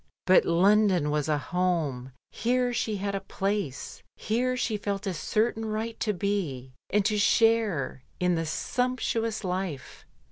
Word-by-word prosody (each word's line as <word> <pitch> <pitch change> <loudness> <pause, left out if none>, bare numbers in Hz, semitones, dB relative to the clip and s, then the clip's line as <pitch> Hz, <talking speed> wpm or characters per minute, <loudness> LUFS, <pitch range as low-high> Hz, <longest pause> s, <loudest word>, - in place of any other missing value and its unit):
But 185 0 +5
London 185 -2 +3
was 150 0 0
a 150 - +2
home, 155 -6 -1 0.2
here 245 +1 0
she 220 -2 -1
had 200 +1 -2
a 195 - -1
place, 195 -7 -3
here 250 +3 -1
she 230 -3 -1
felt 200 -1 -3
a 190 - -1
certain 220 +7 0
right 220 +1 -3
to 215 - +1
be 170 -10 -2 0.2
and 205 0 +2
to 215 - +2
a - - 0
share 210 - +2 0.2
in 180 0 +2
the 165 -1 -1
sumptuous 230 +2 -1
life. 180 -6 -4
200 Hz, 150 wpm, -27 LUFS, 165-220 Hz, 0.2 s, But